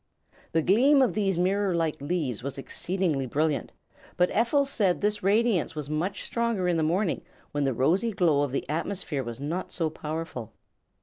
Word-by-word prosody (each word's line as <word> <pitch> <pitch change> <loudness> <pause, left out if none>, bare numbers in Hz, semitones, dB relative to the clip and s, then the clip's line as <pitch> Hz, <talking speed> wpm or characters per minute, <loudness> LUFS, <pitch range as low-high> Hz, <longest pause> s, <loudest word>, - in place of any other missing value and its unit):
The 160 -1 +2
gleam 260 - +5
of 250 - +1
these 195 -4 0
mirror 190 +1 +1
like 165 -4 -1
leaves 145 - -2
was 140 +2 -5
exceedingly 160 -1 -1
brilliant, 150 +3 0 0.5
but 180 0 +3
Ephel 240 +6 +2
said 205 -10 +1
this 210 0 0
radiance 205 -4 +2
was 150 -1 -5
much 175 +6 -2
stronger 230 -6 0
in 175 -2 +2
the - - +1
morning, 175 +4 +1 0.3
when 145 -1 0
the 135 - +1
rosy 180 - +2
glow 165 -8 +2
of 145 -2 0
the 135 - -2
atmosphere 160 -2 -2
was 120 0 -6
not 160 +6 -3
so 165 -3 -1
powerful. 155 -7 -5
175 Hz, 175 wpm, -27 LUFS, 150-200 Hz, 0.5 s, gleam